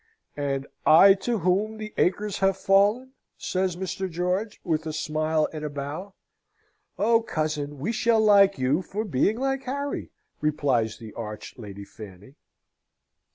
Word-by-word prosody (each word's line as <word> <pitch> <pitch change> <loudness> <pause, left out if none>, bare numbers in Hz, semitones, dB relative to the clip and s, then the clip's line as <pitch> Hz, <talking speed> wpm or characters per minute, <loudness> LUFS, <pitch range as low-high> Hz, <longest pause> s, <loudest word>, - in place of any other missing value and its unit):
"And 140 -1 -2 0.2
I 195 +5 +8
to 225 +4 -2
whom 200 +4 0
the 215 -1 -7
acres 205 +2 0
have 195 -1 +2
fallen?" 205 +7 +3 0.3
says 185 -1 -1
Mr. 190 +1 -4
George, 180 +5 -2
with 160 -2 -1
a 155 - -3
smile 155 +1 0
and 155 -1 -6
a 150 - -2
bow. 145 +8 -6 0.8
"Oh, 230 +2 +3
cousin, 150 -7 -3
we 160 +12 -2
shall 225 0 +2
like 200 -2 +5
you 130 +6 +1
for 210 +4 -4
being 200 - +1
like 270 +1 -1
Harry!" 280 +2 -3 0.3
replies 135 -8 0
the 110 -3 -11
arch 105 -2 -7
Lady 100 -2 -9
Fanny. 100 +3 -12
180 Hz, 145 wpm, -25 LUFS, 145-210 Hz, 0.8 s, I